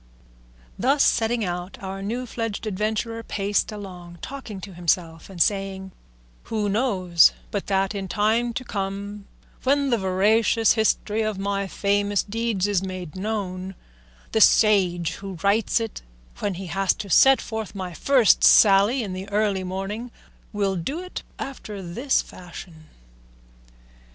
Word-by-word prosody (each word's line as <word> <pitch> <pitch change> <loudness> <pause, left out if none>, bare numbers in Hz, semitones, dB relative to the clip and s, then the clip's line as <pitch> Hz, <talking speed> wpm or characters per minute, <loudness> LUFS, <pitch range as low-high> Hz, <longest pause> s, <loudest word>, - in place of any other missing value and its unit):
Thus 275 +4 +3
setting 230 -1 +2
out, 180 +1 -5
our 195 0 -6
new 235 +6 -3
fledged 225 -3 -4
adventurer 215 +3 -2
paced 205 -2 -1
along, 180 -4 -9
talking 265 -7 -7
to 195 -1 -9
himself 170 -1 -1
and 190 -3 -10
saying, 195 0 0 0.5
"Who 210 -2 -1
knows 190 -7 +4 0.2
but 200 - -3
that 195 0 +1
in 195 -2 -4
time 220 +5 +1
to 255 - -4
come, 200 -1 -5 0.3
when 280 0 +2
the 235 - +2
veracious 210 +4 +3
history 220 -1 +1
of 215 -2 -1
my 200 0 -2
famous 200 +1 0
deeds 225 -2 -1
is 205 -3 +1
made 185 -4 -6
known, 190 -2 -4 0.6
the 220 - +2
sage 185 -7 +4
who 195 -2 -7
writes 205 +4 +2
it, 225 -2 -5 0.4
when 200 -2 -2
he 190 +2 -6
has 190 +2 0
to 205 - -6
set 265 +9 +6
forth 220 -3 -5
my 185 -2 -5
first 255 - +4
sally 205 +5 +6
in 195 -3 -5
the 190 +2 -6
early 205 -2 0
morning, 195 +6 -4 0.4
will 200 -2 0
do 270 - -3
it 365 0 -7 0.2
after 235 -7 -7
this 240 +11 0
fashion? 170 -3 -12
200 Hz, 140 wpm, -24 LUFS, 190-220 Hz, 0.6 s, set